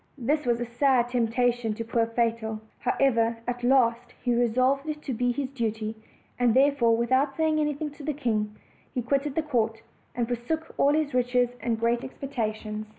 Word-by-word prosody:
This 285 +2 0
was 235 -1 +2
a 240 - -2
sad 240 0 +2
temptation 240 -1 +1
to 230 - -4
poor 230 0 +1
Fatal. 230 -1 -1 0.2
However, 230 -3 +2
at 245 0 -3
last 245 -1 +2
he 245 - +2
resolved 255 +5 +2
to 280 -3 -4
do 245 +2 +1
his 270 +1 -3
duty; 220 -4 -2 0.4
and 245 -2 +3
therefore, 260 -4 +4
without 260 +4 +1
saying 315 -1 +2
anything 300 0 -1
to 290 +1 -12
the 305 - -1
king, 215 -7 -1 0.4
he 250 - -1
quitted 275 +3 0
the 320 - +1
court, 230 -6 -1 0.3
and 240 - 0
forsook 250 +7 -3
all 285 +1 +4
his 305 -2 0
riches 245 -1 +2
and 230 -2 -1
great 235 +1 +2
expecta 255 -5 -3
tions. 215 0 -6
245 Hz, 175 wpm, -27 LUFS, 230-275 Hz, 0.4 s, therefore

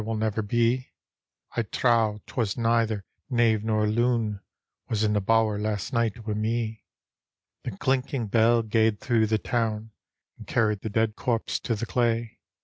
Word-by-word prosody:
will 110 +1 -2
never 110 0 0
be: 120 +4 +1 0.7
I - - +2
trow 110 -2 +1
'twas 110 -5 -2
neither 115 -3 +1 0.2
knave 115 -4 +2
nor 110 -1 +1
loon 115 -1 +1 0.5
Was 110 -1 0
in 105 -1 +2
the 105 - +1
bower 110 0 +2
last 105 -1 -2
night 115 -1 0
wi' 110 - -1
me." 110 +1 -2 0.8
The 110 -6 -5
clinking 130 -2 0
bell 115 +2 +3
gaed 110 -1 +2
through 115 -3 +2
the 110 0 +2
town. 110 -1 -2 0.5
And - - -11
carried 105 -3 +1
the 110 - -4
dead 110 0 +1
corpse 115 -2 -1
to 115 - -2
the 110 - -3
clay. 115 -2 0
110 Hz, 155 wpm, -26 LUFS, 105-115 Hz, 0.8 s, bell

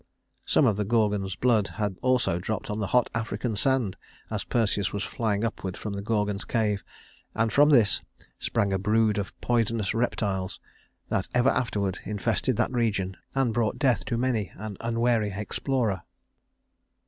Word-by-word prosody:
Some 150 - +4
of 110 -5 +3
the 105 - +1
Gorgon's 105 -3 +1
blood 110 -1 +3
had 105 -3 -1
also 125 -9 +2
dropped 110 +3 -3
on 105 - -2
the 100 - -1
hot 125 +3 +2
African 115 0 -2
sand, 125 -4 +1 0.3
as - - -2
Perseus 105 -4 0
was 100 0 -2
flying 110 -4 -1
upward 95 -5 -3
from 105 - -5
the 100 - -3
Gorgon's 105 -1 0
cave, 105 -3 0 0.5
and 115 -1 +1
from 145 +1 +6
this 120 -9 +4 0.4
sprang 100 -1 0
a 95 - +1
brood 105 +1 +2
of 100 - -6
poisonous 115 -3 +1
reptiles 100 -5 -1 0.5
that 95 - 0
ever 125 +2 +5
afterward 100 -7 0
infested 110 +3 0
that - - +1
region 105 -6 0 0.2
and 135 -4 +2
brought 115 -1 0
death 130 -4 +2
to 120 -3 -1
many 115 -5 0
an 105 0 -6
unwary 115 -2 +1
explorer. 105 0 -1
110 Hz, 160 wpm, -27 LUFS, 100-120 Hz, 0.5 s, from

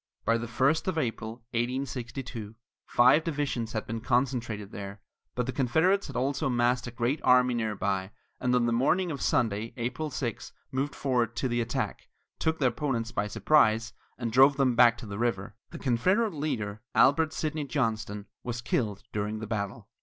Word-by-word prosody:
By 115 +1 +3
the 115 - -4
first 135 +9 +1
of 185 -3 -1
April, 115 -4 -3
1862, 120 -2 -3 0.3
five 125 +6 +5
divisions 140 -8 -2
had 110 - -2
been 115 0 -4
concentrated 120 -5 -1
there, 100 0 -7 0.4
but 125 - 0
the 130 - -2
Confederates 160 +10 +2
had 140 - -9
also 135 +2 0
massed 120 0 +1
a - - -5
great 120 +5 -1
army 125 0 +5
near 110 -3 -1
by, 95 -1 -1 0.3
and 125 0 +1
on 120 -1 +3
the 120 - +1
morning 170 +9 +2
of 140 - -5
Sunday, 110 -1 0
April 125 +6 -2
6, 125 -3 -4 0.2
moved 135 +2 -2
forward 120 -4 0
to 130 - 0
the 120 -1 0
attack, 115 0 -3 0.3
took 160 0 +1
their 130 -5 +3
opponents 120 -3 -2
by 105 - -1
surprise, 110 -1 +3 0.2
and 120 -2 -3
drove 135 +4 +6
them 130 -3 +3
back 120 0 +6
to 120 - -9
the 100 -1 -6
river. 105 -4 -1
The - - -8
Confederate 185 - +1
leader, 110 -9 -3
Albert 155 +3 +5
Sidney 155 -2 -2
Johnston, 110 -6 -2 0.2
was 120 0 -4
killed 105 -5 -1
during 105 +1 -2
the 110 - -5
battle. 105 -1 -4
120 Hz, 175 wpm, -28 LUFS, 115-135 Hz, 0.4 s, drove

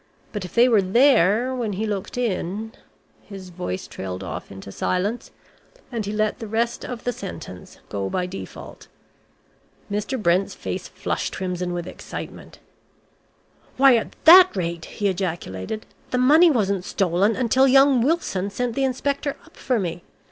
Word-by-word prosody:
But 210 -3 -4
if 180 - -9
they 240 +1 +6
were 225 -5 +4
there 235 +2 +4
when 235 -5 -2
he 210 +4 -2
looked 205 +1 -4
in 220 -2 -2 0.3
" - - -37
His 190 -3 -9
voice 170 - -4
trailed 95 0 -6
off 95 - -7
into 95 0 -9
silence, 200 - -2 0.6
and 230 -3 -2
he - - -2
let 215 +2 0
the 225 - -6
rest 230 +2 -1
of 245 -2 -6
the 245 - -1
sentence 180 - -9
go 100 -1 -3
by 180 - -1
default. 185 +2 -9 1.0
Mr. 210 +6 -2
Brent's 185 -1 +1
face - - -5
flushed - - -3
crimson 180 -1 -3
with 175 -1 -3
excitement. - - -9 1.2
"Why, 270 -1 +7
at 225 - -2
that 360 - +9
rate," 170 -3 -3
he 205 - -2
ejaculated, 180 - -3 0.2
"the 250 - -1
money 305 +7 +6
wasn't 200 - +1
stolen 190 +4 +1
until 260 +2 +3
young 270 -1 +5
Wilson 235 - 0
sent 240 +3 -2
the 275 - -1
inspector 280 +2 -1
up - - -21
for 255 -2 -1
me. 175 -2 -3
210 Hz, 155 wpm, -23 LUFS, 180-250 Hz, 1.2 s, that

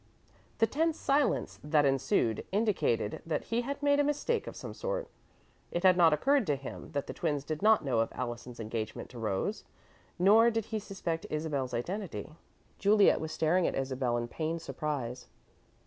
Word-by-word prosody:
The 225 - +5
tense 320 +7 0
silence 280 +1 +1
that 150 -1 +3
ensued 135 - +1
indicated 195 - 0
that 165 - -2
he 230 +1 -1
had 280 +3 -5
made 285 0 +4
a - - +5
mistake 295 +11 0
of - - -6
some - - -7
sort. - - -3 0.6
It 175 - -3
had 185 -1 +7
not 170 -3 +6
occurred 270 - +2
to 145 - +2
him 140 +3 -8
that 140 -1 -1
the - - -6
twins 150 -4 -1
did 155 +1 -4
not 215 -5 +4
know 130 -4 +1
of 115 - +1
Allison's 120 0 -5
engagement 110 0 -5
to 120 - -9
Rose, 105 -4 -2 0.5
nor 215 +6 +6
did 225 -2 -1
he 220 -1 -3
suspect 175 -5 -4
Isabel's 145 -5 -2
identity. 185 - -4 0.5
Juliet 205 +1 +5
was 160 0 -4
staring 165 +3 +2
at - - -2
Isabel 130 -2 -1
in 120 0 -2
pained 160 +5 -3
surprise. 135 -7 -4
160 Hz, 175 wpm, -31 LUFS, 130-220 Hz, 0.6 s, had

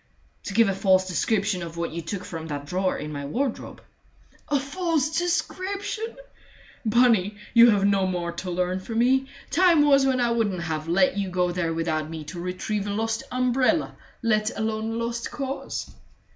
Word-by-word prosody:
"To 195 - -5
give 230 -1 +5
a 195 - +1
false 190 -1 +3
description 195 +2 0
of 170 -1 -7
what 170 0 -2
you 170 +1 -4
took 180 +4 -5
from 160 -1 -6
that 145 -2 -5
drawer 185 +5 0
in 150 +1 -5
my 145 -1 -5
wardrobe." 240 - -3 0.7
"A 290 -1 +2
false 315 +1 -1
description! 395 +5 -2 0.7
Bunny, 220 -3 +3 0.2
you 235 0 +8
have 200 -3 +3
no 195 -1 +3
more 175 -2 -2
to 185 - -6
learn 180 +1 -1
from 225 +4 -5
me. 265 +3 +3 0.2
Time 335 -2 +5
was 275 -2 +5
when 265 -1 +2
I 240 -1 +2
wouldn't 205 -7 0
have 160 -1 -3
let 185 +3 +3
you 195 -2 -1
go 180 -1 +1
there 175 -2 -1
without 160 -2 -1
me 160 -1 -6
to 165 +4 -8
retrieve 185 +3 -3
a - - -2
lost 225 +2 -1
umbrella 255 +4 +1 0.3
let 215 -1 +2
alone 220 0 -2
a - - -3
lost 235 0 -3
cause!" 275 -1 -5
205 Hz, 180 wpm, -25 LUFS, 180-250 Hz, 0.7 s, you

